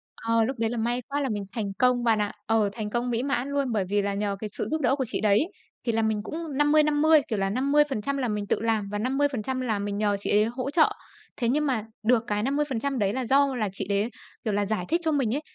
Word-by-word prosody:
Ờ, 230 Hz, 0 st, +1 dB
lúc 255 Hz, +2 st, -3 dB
đấy 225 Hz, -1 st, +1 dB
là 240 Hz, -, -3 dB
may 240 Hz, +2 st, 0 dB
quá 285 Hz, +1 st, -1 dB
là 270 Hz, -, -1 dB
mình 205 Hz, -3 st, -3 dB
thành 205 Hz, -4 st, -3 dB
công 250 Hz, -1 st, +3 dB
bạn 225 Hz, -2 st, +3 dB
ạ. 205 Hz, -, -1 dB
Ờ, 220 Hz, -2 st, +2 dB
thành 215 Hz, -2 st, -4 dB
công 240 Hz, +2 st, -1 dB
mỹ 235 Hz, 0 st, 0 dB
mãn 275 Hz, -2 st, -1 dB
luôn, 280 Hz, -3 st, 0 dB
bởi 205 Hz, -4 st, 0 dB
vì 205 Hz, 0 st, +2 dB
là 200 Hz, 0 st, -1 dB
nhờ 200 Hz, 0 st, -1 dB
cái 215 Hz, -, -5 dB
sự -, -, -2 dB
giúp 315 Hz, 0 st, -1 dB
đỡ 260 Hz, +1 st, +3 dB
của 265 Hz, -2 st, -1 dB
chị -, -, -3 dB
đấy. 215 Hz, -, +3 dB, 0.3 s
Thì 235 Hz, -, +2 dB
là 225 Hz, 0 st, +1 dB
mình 220 Hz, -1 st, 0 dB
cũng 315 Hz, +1 st, -5 dB
50-50, 300 Hz, +1 st, +4 dB
kiểu 215 Hz, -4 st, -2 dB
là, 195 Hz, 0 st, +1 dB
50% 280 Hz, +1 st, +1 dB
là 255 Hz, -, 0 dB
mình 210 Hz, -2 st, -2 dB
tự -, -, 0 dB
làm 220 Hz, -3 st, 0 dB
và 205 Hz, -, -2 dB
50% 260 Hz, +1 st, -1 dB
là 220 Hz, -5 st, -1 dB
mình 200 Hz, 0 st, -3 dB
nhờ 205 Hz, -1 st, +1 dB
chị -, -, -4 dB
ấy 210 Hz, +1 st, +4 dB
hỗ 250 Hz, +4 st, -3 dB
trợ. 315 Hz, +1 st, +4 dB, 0.5 s
Thế 235 Hz, -1 st, 0 dB
nhưng 300 Hz, +3 st, +2 dB
mà 245 Hz, -6 st, 0 dB, 0.2 s
được 235 Hz, +1 st, +3 dB
cái 210 Hz, -1 st, 0 dB
50% 275 Hz, -1 st, -1 dB
đấy 200 Hz, 0 st, +1 dB
là 260 Hz, -1 st, -2 dB
do 275 Hz, +2 st, +3 dB
là 215 Hz, -4 st, -1 dB
chị 195 Hz, -1 st, -5 dB
đấy, 200 Hz, +3 st, +1 dB, 0.3 s
kiểu 215 Hz, -, -1 dB
là, 205 Hz, 0 st, +1 dB
giải 200 Hz, -3 st, -2 dB
thích 335 Hz, +3 st, +1 dB
cho 320 Hz, -, +1 dB
mình 270 Hz, -5 st, +1 dB
ấy, 295 Hz, -, -2 dB
235 Hz, 265 wpm, -26 LUFS, 210-275 Hz, 0.5 s, 50-50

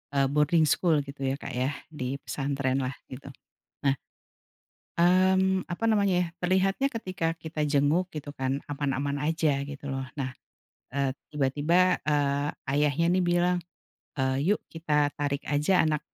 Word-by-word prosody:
e -, -, +1 dB, 0.2 s
boarding 155 Hz, +2 st, +4 dB
school 165 Hz, -5 st, +3 dB
gitu 140 Hz, 0 st, -9 dB
ya 135 Hz, -, 0 dB
Kak -, -, -6 dB
ya. 130 Hz, +3 st, 0 dB, 0.2 s
Di 140 Hz, -2 st, -4 dB
pesantren 135 Hz, -2 st, -1 dB
lah 130 Hz, -, -2 dB, 0.2 s
gitu. 130 Hz, +2 st, -9 dB, 0.6 s
Nah 140 Hz, -1 st, +3 dB, 1.0 s
Mhm, 185 Hz, +2 st, +4 dB
apa 225 Hz, +6 st, -1 dB
namanya 200 Hz, -3 st, +3 dB
ya, 175 Hz, -, 0 dB
terlihatnya 190 Hz, +7 st, +1 dB
ketika 185 Hz, -6 st, -3 dB
kita 160 Hz, -2 st, -3 dB
jenguk 150 Hz, +5 st, +2 dB
gitu 150 Hz, -2 st, -6 dB
kan, 135 Hz, +1 st, -1 dB
aman-aman 140 Hz, 0 st, -1 dB
aja, 155 Hz, -3 st, +1 dB
gitu 140 Hz, 0 st, -7 dB
loh. 135 Hz, 0 st, -3 dB
Nah, 135 Hz, -3 st, -3 dB, 0.6 s
e 140 Hz, -, -3 dB, 0.3 s
tiba-tiba, 150 Hz, +6 st, +3 dB
eee, 145 Hz, -1 st, +1 dB, 0.2 s
ayahnya 145 Hz, +2 st, +2 dB
nih 185 Hz, -, +2 dB
bilang, 175 Hz, +1 st, +2 dB, 0.6 s
"eee, 130 Hz, -1 st, +1 dB
yuk 205 Hz, +2 st, +2 dB
kita 150 Hz, -3 st, +1 dB
tarik 140 Hz, -1 st, -2 dB
aja 150 Hz, +6 st, +2 dB
anak" 155 Hz, -1 st, +1 dB
150 Hz, 145 wpm, -28 LUFS, 140-175 Hz, 1.0 s, boarding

